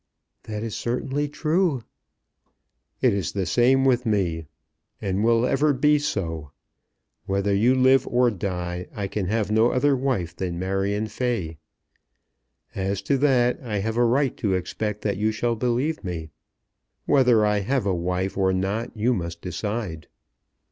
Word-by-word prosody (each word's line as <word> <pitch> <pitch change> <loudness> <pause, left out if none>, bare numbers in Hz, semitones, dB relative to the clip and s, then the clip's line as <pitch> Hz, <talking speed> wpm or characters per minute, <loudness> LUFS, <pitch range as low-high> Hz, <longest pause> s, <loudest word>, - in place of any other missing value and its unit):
"That 105 0 -5
is 115 -2 -4
certainly 135 +4 -2
true." 155 -3 0 1.2
"It 125 -4 +4
is 100 -4 -2
the 95 -2 -1
same 125 +8 +3
with 125 -2 +3
me, 90 -8 -1 0.5
and 95 +1 -1
will 115 +1 +3
ever 145 +3 +2
be 150 +3 +3
so. 80 - -3 0.8
Whether 100 +1 0
you 115 +6 +3
live 130 +1 +4
or 125 0 +3
die, 90 -3 -4
I 100 - -2
can 95 -1 -3
have 105 0 0
no 110 +2 +4
other 140 +3 +2
wife 125 -11 -1
than 90 -2 -3
Marion 95 +3 -1
Fay. 110 - -3 1.1
As 100 -1 -2
to 140 +6 +1
that 125 -3 +3
I 110 -5 -3
have 110 +3 -2
a 120 - +3
right 130 +3 +2
to 100 -3 0
expect 105 +3 -3
that 100 -3 -1
you 110 +2 +1
shall 115 +2 -1
believe 125 +5 -1
me. 85 -4 -5 0.7
Whether 125 -6 +4
I 105 0 +2
have 125 +4 -1
a 100 - +1
wife 90 +2 -2
or 95 -1 +2
not 100 +6 -2
you 120 +4 +2
must 85 -5 -4
decide." 90 -3 -4
110 Hz, 155 wpm, -24 LUFS, 95-125 Hz, 1.2 s, It